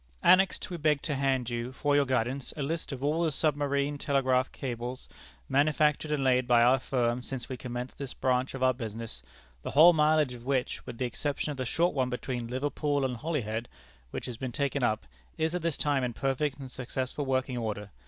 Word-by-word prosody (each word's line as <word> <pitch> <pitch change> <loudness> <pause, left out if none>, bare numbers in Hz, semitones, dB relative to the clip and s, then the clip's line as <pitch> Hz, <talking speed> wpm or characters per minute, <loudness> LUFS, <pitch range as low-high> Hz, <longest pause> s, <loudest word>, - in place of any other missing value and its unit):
"Annexed 190 +1 +5
we 175 - -3
beg 150 -2 +1
to 150 - -1
hand 135 -3 0
you, 120 +1 -3
for 145 +2 +1
your 145 -1 +4
guidance, 130 +1 -1
a 145 - -1
list 160 +3 -3
of 135 -1 -5
all 155 +4 +1
the 160 - +2
submarine 145 -1 0
telegraph 130 -2 +2
cables 125 -1 -5 0.4
manufactured 150 +1 +2
and 145 -2 +1
laid 125 -1 +3
by 120 -1 +5
our 130 +2 +5
firm 120 -2 0
since 130 -1 -5
we 130 - -4
commenced 125 0 -6
this 140 -3 -5
branch 130 0 0
of 130 - -3
our 130 0 +5
business, 115 - -6 0.4
the - - -5
whole 165 +5 +8
mileage 155 -3 +3
of 120 -1 -10
which, 130 -1 -1
with 115 - -7
the 130 - -1
exception 145 +4 -2
of 145 - -6
the 130 - -2
short 170 +8 +1
one 130 -2 0
between 125 -1 -3
Liverpool 145 +2 0
and 125 -2 -2
Holyhead, 120 -6 -2 0.4
which - - -5
has 120 -3 -5
been 130 0 -4
taken 140 +2 -1
up, 110 - +1 0.3
is 160 +1 0
at 180 - -1
this 165 -2 -1
time 145 -3 +1
in 125 -1 -1
perfect 135 +3 -1
and 135 -2 -8
successful 130 +3 -3
working 130 -1 0
order. 105 -3 -4
130 Hz, 205 wpm, -29 LUFS, 125-145 Hz, 0.4 s, whole